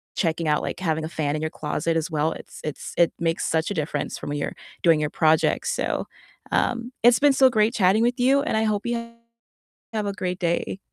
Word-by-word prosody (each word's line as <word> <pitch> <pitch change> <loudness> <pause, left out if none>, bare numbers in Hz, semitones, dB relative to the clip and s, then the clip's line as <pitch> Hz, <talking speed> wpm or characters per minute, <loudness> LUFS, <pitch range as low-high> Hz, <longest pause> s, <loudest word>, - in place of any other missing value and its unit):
checking 165 -2 0
out, 150 0 +2
like, - - -4
having 160 -3 -1
a 160 - -5
fan 150 -3 -1
in 155 - -3
your 155 0 -2
closet 155 +2 -2
as 165 +2 -1
well, 155 +1 +1
it's - - -11
it's 150 -2 -6
it 170 - +4
makes 165 0 0
such 160 +4 0
a - - 0
difference 150 -3 -3
from - - -7
when 145 - -2
you're - - -3 0.3
doing 165 -3 +5
your 150 -1 -1
projects, 160 0 +2
so, - - -2 0.4
um, 240 +1 0
it's 240 -1 +6
been 290 -1 +5
so 265 -1 +6
great 220 -1 +2
chatting 200 0 +3
with 245 +2 +1
you, 270 +3 +4
and 280 - -1
I 220 - +2
hope 210 -1 0
you 235 -1 -3 0.8
have 215 -1 -1
a 200 - -2
great 185 -2 -3
day 170 +2 -1
170 Hz, 225 wpm, -24 LUFS, 155-225 Hz, 0.8 s, it's